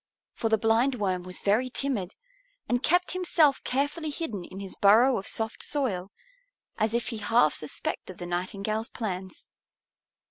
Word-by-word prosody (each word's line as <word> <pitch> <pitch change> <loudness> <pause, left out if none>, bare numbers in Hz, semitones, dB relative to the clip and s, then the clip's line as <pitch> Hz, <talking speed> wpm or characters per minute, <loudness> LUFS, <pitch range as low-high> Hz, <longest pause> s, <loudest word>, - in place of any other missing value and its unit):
For 225 - -1
the 220 - +4
Blindworm 225 -4 +1
was 180 0 -4
very 220 +6 +2
timid 235 -8 -2 0.5
and 245 0 +1
kept 355 +5 +3
himself 335 -6 +3
carefully 290 +4 -1
hidden 260 - -4
in 190 - -9
his 195 -1 -7
burrow 230 +6 +6
of 195 - -6
soft 220 0 -2
soil, 205 -10 -1 0.7
as 220 +1 +1
if 235 -2 -1
he 230 - -4
half 215 -6 +3
suspected 165 +4 -4
the 175 - -6
Nightingale's 195 +5 -2
plans. 190 -5 -6
220 Hz, 145 wpm, -27 LUFS, 190-260 Hz, 0.7 s, burrow